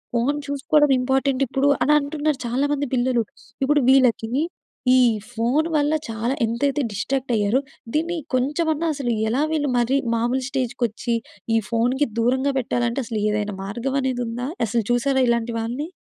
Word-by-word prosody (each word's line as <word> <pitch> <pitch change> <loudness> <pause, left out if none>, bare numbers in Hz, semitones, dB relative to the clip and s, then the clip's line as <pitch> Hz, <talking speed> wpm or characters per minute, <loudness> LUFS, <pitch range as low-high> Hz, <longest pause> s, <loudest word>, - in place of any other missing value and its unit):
Phone 270 +5 +1
చూసుకోడం 290 +1 +2
ఇంపార్టెంటిప్పుడు 270 +1 +1 0.2
అనంటున్నారు 300 0 +1
చాలామంది 285 +3 0
పిల్లలు. 245 -1 +1 0.4
ఇప్పుడు 290 +1 +3
వీళ్ళకీ, 250 -4 +4 0.7
ఈ - - +6 0.3
ఫోను 245 +8 +1
వల్ల 295 +1 +2 0.2
చాలా 225 +3 -1
ఎంతైతే 275 +6 0
డిస్ట్రాక్టయ్యారో, 235 0 0 0.4
దీన్ని 335 +3 0 0.2
కొంచమన్నా 310 +5 0
అసలు 265 -4 -2 0.2
ఎలా 250 +5 +1
వీళ్ళు 295 -3 0
మరీ 245 +3 +2 0.2
మాములు 240 +3 0
స్టేజ్‌కొచ్చీ, 240 -3 -1 0.4
ఈ - - +5
ఫోనుకి 245 +5 +1
దూరంగా 260 +4 +1
పెట్టాలంటే, 240 +1 -1
అసలు 220 -2 -3
ఏదైనా 210 -1 -2
మార్గవనేదుందా? 245 +2 -2 0.2
అసలు 230 +2 0
చూశారా 265 +2 +2
ఇలాంటి 235 0 0
వాళ్ళని? 245 +8 -3
260 Hz, 125 wpm, -22 LUFS, 235-285 Hz, 0.7 s, ఈ